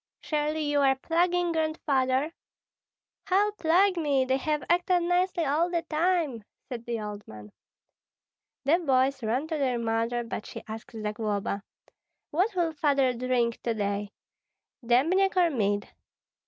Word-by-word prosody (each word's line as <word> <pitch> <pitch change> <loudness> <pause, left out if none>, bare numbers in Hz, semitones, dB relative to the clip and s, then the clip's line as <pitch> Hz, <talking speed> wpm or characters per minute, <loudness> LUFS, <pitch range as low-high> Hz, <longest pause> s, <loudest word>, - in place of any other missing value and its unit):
Surely 305 0 -1
you 290 -1 +1
are 270 -1 +4
plaguing 345 +4 +1
Grandfather?" 300 -3 0 0.9
"How 400 +3 +3
plague 370 0 +3
me! 285 -5 +2
They 260 +1 +1
have 300 0 -1
acted 355 0 +2
nicely 355 -1 +1
all 310 +5 +1
the 340 -1 -1
time," 315 - 0 0.2
said 245 -3 -7
the 235 -1 -2
old 210 -1 -7
man. 105 -1 -11 1.1
The 310 +6 +3
boys 265 -4 +2
ran 240 +6 0
to 315 -2 -2
their 255 -3 +1
mother; 230 +1 -1
but 230 -2 -6
she - - -8
asked 220 +1 -8
Zagloba, 210 -2 -2 0.7
"What 375 +7 +1
will 340 -2 +1
Father 280 -4 +2
drink 245 -1 0
to 230 -1 -1
day, 205 -1 -2 0.7
dembniak 335 +12 +3
or 350 -2 +4
mead?" 205 -5 0
280 Hz, 140 wpm, -27 LUFS, 235-335 Hz, 1.1 s, are